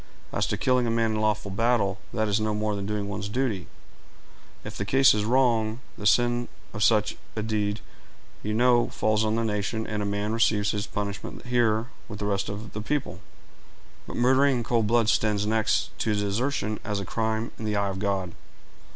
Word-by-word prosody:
"As - - +1
to - - -1
killing 125 -2 +2
a - - +1
man 115 -1 +1
in 110 0 -1
lawful 105 -2 0
battle, 100 -2 +1
that 110 -1 0
is 105 +1 +1
no 110 -1 0
more 105 0 -1
than 100 -1 -4
doing 105 -1 -2
one's 100 0 -4
duty. 110 -6 -1 1.0
If - - -7
the - - -2
cause 135 +7 +5
is 105 0 0
wrong, 115 -2 +2 0.2
the 105 - -1
sin 120 +2 +3 0.3
of 105 - -1
such 105 -2 +3 0.2
a 110 - -2
deed, 105 -1 -1 0.6
you 105 +1 -2
know, 120 0 +4
falls 110 0 +1
on 110 0 +1
the 115 - 0
nation, 110 +1 -1
and 105 -1 -3
a - - -1
man 105 +1 -1
receives 110 -3 +2
his 105 -1 -3
punishment 100 +2 -5
here 120 -2 +1 0.2
with 105 - -7
the 105 - -3
rest 100 0 -1
of 105 +2 -7
the 105 - -4
people; 145 +5 -2 0.9
but - - -6
murdering 130 +2 +4
in 120 - -2
cold 115 -2 +1
blood 115 0 +3
stands 105 -2 +2
next 110 0 +1
to 110 - +1
desertion 105 +2 -1
as 105 -1 -2
a 100 - -4
crime 110 +2 -1
in 110 - -5
the 105 -1 -1
eye 100 -1 +1
of 95 -1 -4
God." 95 -3 -1
110 Hz, 200 wpm, -26 LUFS, 105-115 Hz, 1.0 s, cause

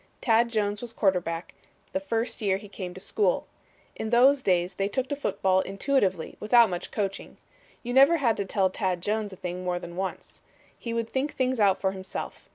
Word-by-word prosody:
Tad 235 0 +3
Jones 205 -2 -1
was 240 -1 -7
quarterback 180 -5 0 0.4
the 285 - +1
first 230 -5 -2
year 195 -3 +2
he 205 +1 -11
came 185 -2 -6
to - - -8
school. 440 - 0 0.5
In 220 - -4
those 260 +4 +5
days 180 -3 +1
they 195 +2 -1
took 255 +6 -2
to 285 - -1
football 190 -9 +1
intuitively 195 - 0
without 230 0 +5
much 175 0 -4
coaching. 195 -2 -4 0.5
You 245 0 -3
never 275 +6 +6
had 240 -7 +2
to 200 - -2
tell 190 -1 +1
Tad 185 -3 -1
Jones 210 +1 -1
a - - -9
thing 180 0 -5
more 180 -1 -1
than 175 -1 -8
once. 190 0 -5 0.3
He 235 - -6
would 230 -1 -1
think 270 +3 -1
things 255 -1 0
out 200 -3 +4
for 190 - +1
himself. 190 0 -7
205 Hz, 195 wpm, -27 LUFS, 190-240 Hz, 0.5 s, never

